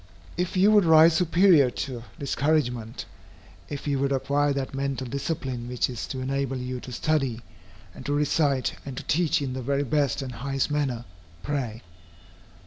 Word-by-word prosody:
If 180 +2 -2
you 200 +3 +5
would 210 -2 +6
rise 160 0 +7
superior 170 -4 +5
to 125 +2 -5 0.2
discouragement, 140 -6 -1 0.6
if 145 -1 -6
you 140 -2 +1
would 140 0 0
acquire 140 +2 +1
that 140 -1 -3
mental 135 -1 -2
discipline 135 -2 -3
which 125 +1 0
is 120 - -5
to 130 - -5
enable 135 0 -1
you 125 0 -4
to 125 - -9
study, 135 -3 0 0.5
and - - -10
to 145 - 0
recite 145 -2 +1
and 135 -2 -7
to - - -5
teach 155 -2 +1
in 130 -2 -3
the 130 - -4
very 140 +3 0
best 140 0 0
and 130 - -5
highest 135 +3 -2
manner, 135 -5 -1 0.4
pray. 125 -7 -3
140 Hz, 165 wpm, -26 LUFS, 130-150 Hz, 0.6 s, rise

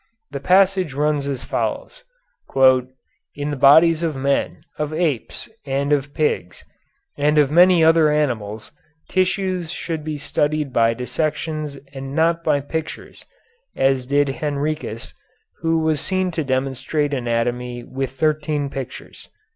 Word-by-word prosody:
The 140 - -4
passage 185 -1 +3
runs 150 -1 0
as 135 -3 -3
follows: - - -3 0.5
"In 130 +2 0
the - - -2
bodies 155 +4 +6
of 165 -3 -1
men, 135 +1 -1 0.2
of 150 0 -2
apes, 155 -7 -2 0.2
and 140 +1 0
of 140 0 -1
pigs, 120 - -1 0.6
and 150 +1 +2
of 145 -2 +4
many 175 +1 +6
other 160 -1 +5
animals, 120 -7 -2 0.4
tissues 185 -2 0
should 165 -3 -4
be 155 -1 -4
studied 150 -1 -1
by 115 0 +3
dissections 150 +3 -3 0.2
and 135 0 -7
not 165 +1 +2
by 150 -3 +2
pictures, 160 +3 -6 0.5
as 135 -1 +1
did 145 +1 +2
Henricus, 145 -5 -3 0.5
who 165 0 +1
was 160 -2 +1
seen 185 0 0
to 160 -2 -2
demonstrate 135 +2 -1
anatomy 120 0 -2
with 135 +1 -4
thirteen 145 +1 -1
pictures." 135 -3 -8
145 Hz, 130 wpm, -21 LUFS, 135-160 Hz, 0.6 s, bodies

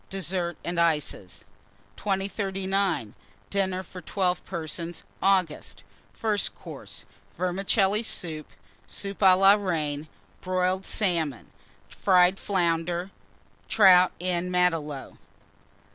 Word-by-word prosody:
DESSERT 185 -2 -2
AND 170 0 -2
ICES. 150 - -1 0.5
2039. 195 - -1 0.4
DINNER 190 -2 0
FOR 180 +1 -10
12 180 0 -1
PERSONS 170 0 -5 0.2
(August) 185 -5 0 0.3
FIRST 215 -2 -1
COURSE. - - -10 0.3
Vermicelli 195 +3 +1
Soup. 160 -8 -4 0.4
Soup 200 -1 -4
à 190 -2 +6
la 195 +1 +7
Reine. 155 -7 -2 0.3
Boiled 185 +1 0
Salmon. 165 - 0 0.4
Fried 185 0 +3
Flounders. 175 -1 0 0.6
Trout 185 -4 +6
en 180 0 -1
Matelot. 165 -6 0
180 Hz, 90 wpm, -26 LUFS, 170-195 Hz, 0.6 s, la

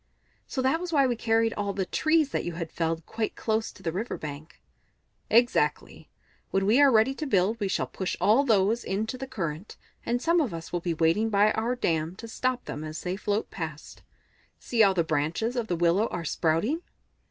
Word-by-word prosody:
"So 260 - -2
that 265 +5 +2
was 360 -1 -4
why 280 -4 +4
we 245 -2 +1
carried 225 0 +1
all 200 -1 -2
the 195 -1 -1
trees 310 - +2
that - - -1
you 175 - -4
had 165 -1 -5
felled 165 -1 -2
quite 220 -1 -3
close 220 0 -1
to 190 - -17
the 165 - -1
river 205 +8 -3
bank?" 150 +1 -8 0.7
"Exactly. 240 +2 +1 0.4
When 195 0 +1
we 230 +8 +4
are 280 -1 +7
ready 225 +3 +4
to 300 +2 -5
build 210 0 +2
we 205 - 0
shall 190 - 0
push 190 - -4
all 230 +7 +4
those 220 -2 +2
into 215 +5 -2
the 265 +1 -6
current, 170 -3 -5 0.3
and 240 +1 0
some 335 +5 +2
of 235 - -2
us 165 +1 -8
will 175 - -1
be 170 -1 -2
waiting 165 +8 +2
by 205 0 +4
our 230 +4 -1
dam 165 -6 -1
to 230 - -9
stop 255 +2 -2
them 150 - -5
as 155 0 -6
they 180 +1 -2
float 205 +2 -2
past. 160 -4 -7 0.6
See 235 - -4
how 200 -3 +6
the 175 -3 +1
branches 160 - -1
of 235 -3 -1
the 175 - 0
willow 175 +6 +2
are 170 -1 -5
sprouting!" 175 - 0
210 Hz, 210 wpm, -27 LUFS, 170-240 Hz, 0.7 s, are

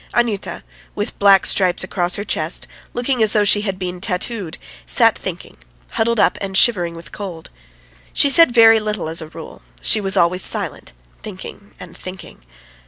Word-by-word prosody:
Anyuta, 230 -5 -2 0.3
with 205 +2 -5
black 195 -1 +4
stripes 185 -2 +2
across 180 -1 -2
her 200 - -4
chest, 160 -5 -1 0.3
looking 245 0 -2
as 220 -1 +3
though 210 - +3
she 205 0 +3
had 195 -3 -4
been 180 -1 -6
tattooed, 195 -2 -4 0.3
sat - - +3
thinking, - - -8 0.4
huddled 235 0 -1
up - - +1
and 195 -1 -2
shivering 175 -8 +2
with 165 - -12
cold. 180 -6 -9 0.6
She - - +3
said 305 0 +6
very 225 -2 +5
little 210 -5 -4
as 165 +1 -1
a 160 - -8
rule; - - -12 0.2
she 210 - +2
was 195 -1 0
always 175 +2 +2
silent, - - +1 0.3
thinking 200 0 -11
and 175 -2 -12
thinking. 185 - -11
195 Hz, 170 wpm, -18 LUFS, 180-220 Hz, 0.6 s, said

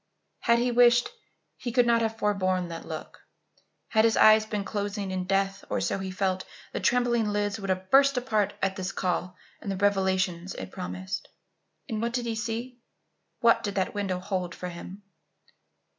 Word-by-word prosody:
Had 235 0 +3
he 245 +1 +1
wished, 240 0 +5 0.5
he 240 - -4
could 245 +1 +4
not 235 -1 +3
have 225 0 -1
forborne 185 -4 0
that 165 0 -7
look. 160 -1 -8 0.6
Had 220 -1 +4
his 225 0 +3
eyes 215 0 +7
been 210 -2 -2
closing 205 -1 -3
in 185 -1 -2
death, 195 +1 0
or - - 0
so - - -1
he 190 0 -4
felt, 185 0 -1 0.3
the - - -2
trembling 240 -2 +2
lids 205 +1 -1
would 195 -1 -5
have 185 0 -2
burst 275 0 +6
apart 220 -5 +1
at 195 0 +1
this 185 0 -3
call 180 -1 -2 0.3
and 200 - -4
the 195 - -3
revelations 190 -2 +1
it 95 0 -7
promised. 90 +1 -5 0.6
And 220 -1 -3
what 235 0 -1
did 245 -1 -1
he 230 - -1
see? 235 +2 -4 0.6
What 230 -1 +5
did 205 -4 -3
that 190 -1 0
window 200 -3 -1
hold 185 -1 -3
for 180 - -5
him? 180 +3 -9
200 Hz, 180 wpm, -27 LUFS, 185-230 Hz, 0.6 s, eyes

